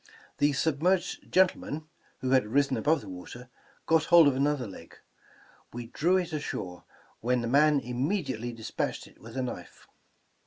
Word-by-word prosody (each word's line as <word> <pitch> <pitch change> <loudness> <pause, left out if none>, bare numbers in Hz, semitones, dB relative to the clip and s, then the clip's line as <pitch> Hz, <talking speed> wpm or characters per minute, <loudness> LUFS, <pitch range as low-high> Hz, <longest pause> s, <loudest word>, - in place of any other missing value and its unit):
The 145 0 +3
submerged 165 +6 0
gentleman, 160 -4 +1 0.3
who 130 - -1
had 130 -5 +4
risen 135 +3 +2
above 150 +6 +2
the 105 - -12
water, 95 +7 -9 0.4
got 160 -1 +3
hold 170 -3 +7
of 140 - +2
another 140 -1 +1
leg. 95 -5 -11 0.8
We 120 0 -6
drew 170 +10 +1
it 175 -3 -2
ashore, 90 -11 -5 0.3
when 125 +1 +1
the 115 - -2
man 145 +3 +4
immediately 130 - -2
despatched 115 -2 -4
it - - -19
with 115 +3 -10
a 130 - 0
knife. 125 - -7
135 Hz, 155 wpm, -28 LUFS, 120-155 Hz, 0.8 s, hold